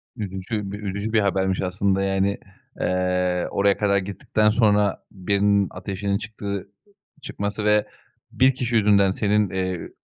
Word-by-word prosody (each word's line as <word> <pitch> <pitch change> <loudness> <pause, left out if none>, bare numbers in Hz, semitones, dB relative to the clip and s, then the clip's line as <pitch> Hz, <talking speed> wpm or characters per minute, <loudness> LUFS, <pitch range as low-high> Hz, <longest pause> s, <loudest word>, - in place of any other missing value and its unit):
Üzücü 100 -1 -4
bi - - -5
üzücü 100 +1 -4
bir 110 - +4
habermiş 95 -2 0
aslında, 95 +1 0
yani, 95 0 0 0.4
eee, 90 -1 0
oraya 100 0 +2
kadar 100 -1 +2
gittikten 100 +2 0
sonra 105 -3 +2
birinin 100 +1 +1
ateşinin 100 +1 -3
çıktığı 100 -2 -5 0.5
çıkması 105 -1 -4
ve 105 0 +3 0.4
1 130 0 +3
kişi 120 -2 -2
yüzünden 100 -3 +4
senin, 105 0 +1
eee, 95 -2 -3
100 Hz, 130 wpm, -23 LUFS, 95-105 Hz, 0.5 s, bir